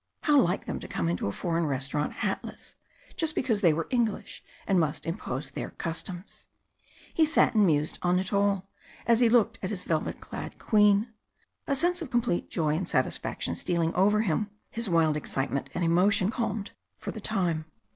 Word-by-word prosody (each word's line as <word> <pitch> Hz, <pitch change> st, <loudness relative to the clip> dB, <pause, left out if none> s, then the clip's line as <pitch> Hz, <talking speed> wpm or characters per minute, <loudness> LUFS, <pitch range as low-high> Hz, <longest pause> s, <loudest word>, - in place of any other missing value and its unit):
How 295 Hz, -3 st, +5 dB
like 175 Hz, -5 st, 0 dB
them -, -, -3 dB
to -, -, -8 dB
come 85 Hz, -, -2 dB
into 85 Hz, +3 st, -1 dB
a -, -, -1 dB
foreign 165 Hz, -, -1 dB
restaurant 140 Hz, +2 st, -1 dB
hatless, -, -, -4 dB, 0.4 s
just 320 Hz, -2 st, 0 dB
because 225 Hz, -6 st, +1 dB
they 175 Hz, -5 st, +6 dB
were 160 Hz, +1 st, -1 dB
English 235 Hz, -5 st, -1 dB, 0.2 s
and 190 Hz, -2 st, +3 dB
must 155 Hz, -1 st, -1 dB
impose 160 Hz, -5 st, -4 dB
their -, -, -5 dB
customs! 175 Hz, +3 st, -6 dB, 0.7 s
He 325 Hz, -, +4 dB
sat 315 Hz, -3 st, +3 dB
and 210 Hz, -3 st, +5 dB
mused 150 Hz, -1 st, +1 dB
on 180 Hz, 0 st, +2 dB
it 190 Hz, +2 st, -2 dB
all, 200 Hz, -1 st, +1 dB, 0.4 s
as 230 Hz, 0 st, +4 dB
he 240 Hz, -2 st, +5 dB
looked 225 Hz, -1 st, +3 dB
at 185 Hz, -, -2 dB
his 190 Hz, -4 st, -4 dB
velvet 160 Hz, -2 st, -1 dB
clad -, -, -7 dB
Queen. 210 Hz, +1 st, +3 dB, 0.5 s
A 280 Hz, -, +1 dB
sense 350 Hz, +5 st, +1 dB
of 315 Hz, -, -5 dB
complete 240 Hz, -7 st, 0 dB
joy 155 Hz, -3 st, 0 dB
and 180 Hz, -, -2 dB
satisfaction -, -, 0 dB
stealing 170 Hz, -2 st, 0 dB
over 205 Hz, +3 st, +3 dB
him, 210 Hz, +1 st, 0 dB, 0.2 s
his 230 Hz, -2 st, -1 dB
wild 165 Hz, -3 st, +3 dB
excitement 140 Hz, -2 st, -2 dB
and -, -, 0 dB
emotion 190 Hz, +4 st, +3 dB
calmed 220 Hz, -3 st, -2 dB, 0.3 s
for -, -, -5 dB
the 220 Hz, -, -8 dB
time. 175 Hz, -7 st, -1 dB
190 Hz, 180 wpm, -28 LUFS, 165-225 Hz, 0.7 s, they